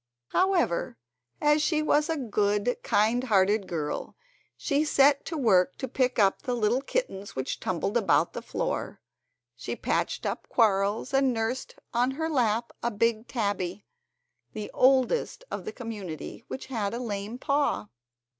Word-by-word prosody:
However, 350 - +1 0.4
as 295 0 +3
she 305 0 +1
was 300 +1 +2
a 325 - 0
good, 210 -2 +1
kindhearted 210 -3 +2
girl, 155 -4 -3 0.4
she 285 +1 +1
set 280 -2 +4
to 325 - -4
work 185 -9 +3
to 260 - -4
pick 255 0 0
up 195 -3 +3
the 250 - -2
little 235 +3 +1
kittens 275 - -3
which 130 0 -3
tumbled 185 +3 -2
about 235 - +3
on - - -37
the - - -5
floor, - - -3 0.6
she - - -5
patched - - -1
up - - -3
quarrels, 205 +1 +2
and 270 -1 +4
nursed 230 +2 -2 0.2
on 245 +2 +2
her 320 0 -1
lap 235 -4 +1
a 235 - 0
big 230 +1 0
tabby—the 210 - -6
oldest 265 - +2
of - - -4
the 435 - -4
community—which 225 - -7
had 225 -5 -2
a - - -3
lame 210 -1 -4
paw. 275 - 0
235 Hz, 145 wpm, -27 LUFS, 205-275 Hz, 0.6 s, set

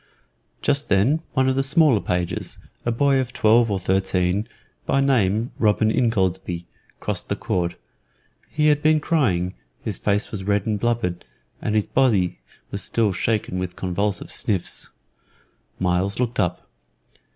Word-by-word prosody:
Just 145 0 +1
then 125 +12 +3
one 130 0 +2
of 130 - +2
the 135 - +2
smaller 140 -3 +4
pages, 90 -1 -2 0.3
a - - +3
boy 135 +3 +3
of 125 -1 -3
twelve 115 +1 +4
or 100 - 0
thirteen, 95 +1 0 0.4
by 135 - +2
name 115 -4 +2
Robin 110 0 +3
Ingoldsby, 95 -7 0 0.3
crossed - - -3
the - - 0
court. 85 -1 -1 0.7
He 150 0 +2
had 150 -1 +3
been 155 0 +4
crying; 100 - +1 0.3
his - - -3
face 105 +1 0
was 100 -3 -5
red 100 0 +1
and 105 -2 -1
blubbered, 115 -7 -1 0.4
and 105 - -1
his 105 - +2
body 105 - +2 0.3
was - - -2
still 110 -4 +1
shaken 100 -2 -1
with 90 -1 -4
convulsive 95 +2 -2
sniffs. 95 -5 -2 0.9
Myles 90 +3 0
looked 125 -1 -1
up. 90 0 -1
105 Hz, 145 wpm, -23 LUFS, 95-130 Hz, 0.9 s, smaller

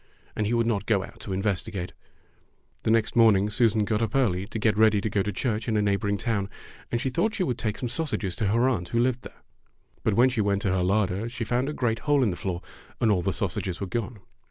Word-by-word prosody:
And 105 - 0
he] 120 - +1
would 115 -1 +2
not 105 -4 -1
go 100 -4 +2
out - - -12
to - - -9
inves 95 0 0
tigate. 95 -5 -5 0.9
The - - -1
next 110 0 +2
morning 105 -3 +5
Susan 110 -1 +2
got 110 +1 0
up 115 0 -1
early 100 -8 +1
to 115 - -5
get 110 0 +2
ready 110 -1 +4
to 105 +1 -2
go 100 - +1
to 105 - -2
church 110 +2 -2
in 110 -2 +1
a - - +3
neighboring 100 0 0
town, 100 -3 -1 0.4
and 120 - 0
she 130 +1 -1
thought 220 - 0
she 190 - 0
would 125 -8 -2
take 105 -2 -2
some 125 - -3
sausages 120 - -2
to 105 - 0
her 115 +5 +3
aunt 100 -10 0
who 115 - 0
lived 125 0 +1
there. - - -13 0.6
But 105 - +1
when 125 +4 +5
she 125 -4 0
went 100 0 0
to 95 - +1
her 95 -1 +1
larder 100 +3 0
she 120 0 -4
found 125 +4 0
a - - -3
great 115 -5 0
hole 145 -2 +2
in 115 - +2
the 90 - -2
floor, 90 -1 -4 0.4
and 115 -2 +3
all 95 -3 +2
the 95 - 0
sausages 95 -3 -2
were 100 - -2
gone. 115 +3 -4
110 Hz, 255 wpm, -26 LUFS, 100-120 Hz, 0.9 s, morning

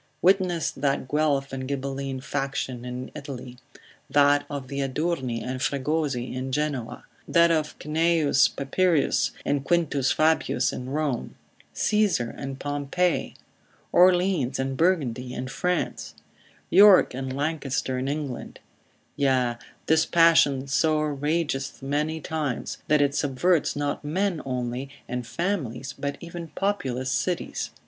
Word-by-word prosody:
Witness 180 -3 +3
that 135 -1 -1
Guelph 145 -2 0
and 130 -1 -4
Ghibelline 135 -1 -3
faction 135 -3 -3
in 125 +1 -6
Italy; 130 -4 -8 0.5
that 145 0 +4
of 140 -3 -5
the 140 +1 -4
Adurni 135 -3 -1
and 130 0 -4
Fregosi 140 -2 -1
in 130 +1 -4
Genoa; 140 -4 -2 0.2
that 170 0 +5
of 155 -2 0
Cneius 155 -2 +3
Papirius, 160 +3 +1 0.2
and 140 -1 0
Quintus 145 -5 +1
Fabius 160 +1 +2
in 125 0 -6
Rome; 145 -4 -2 0.4
Caesar 205 - +1
and 135 -1 -6
Pompey; 145 +5 -1 0.6
Orleans 180 -7 +4
and 135 0 -2
Burgundy 130 -7 0
in 130 - -4
France; 180 +5 -2 0.6
York 200 -3 +7
and 130 +1 -4
Lancaster 140 -3 -1
in 130 - -2
England: 145 -3 -4 0.6
yea, 130 -4 +1 0.3
this 160 0 +3
passion 160 -5 +4
so 155 +3 +2
ragethmany 150 0 -1
times, 150 -6 -3
that 150 -1 +4
it 140 -1 +1
subverts 145 +5 +1
not 145 +1 -2
men 180 +3 -1
only, 125 +1 -3 0.2
and 125 -1 -4
families, 135 - -3
but 140 0 -4
even 170 0 -7
populous 130 -11 -1
cities. 180 +4 -2
145 Hz, 120 wpm, -25 LUFS, 130-160 Hz, 0.6 s, York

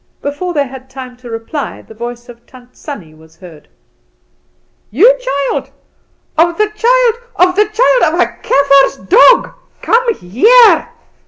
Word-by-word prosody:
Before 290 +6 -4
they 285 -1 0
had 265 0 -12
time 260 -2 -10
to 245 -1 -13
reply 225 +6 -6
the - - -15
voice 240 +2 -8
of 235 -1 -16
Tant 250 -1 -18
Sannie 190 - -10
was 160 +1 -20
heard. 165 -5 -15 1.2
"You 430 - +4
child, 280 - -3 0.7
of 340 +1 +1
the 425 0 0
child, 475 +2 +1 0.2
of 360 +1 +2
the 420 +2 +2
child 435 -4 +2
of - - -3
a - - +4 0.2
Kaffer's 275 0 +2
dog, - - +4 0.3
come 465 0 +1
here!" 435 - +3
280 Hz, 145 wpm, -13 LUFS, -, 1.2 s, You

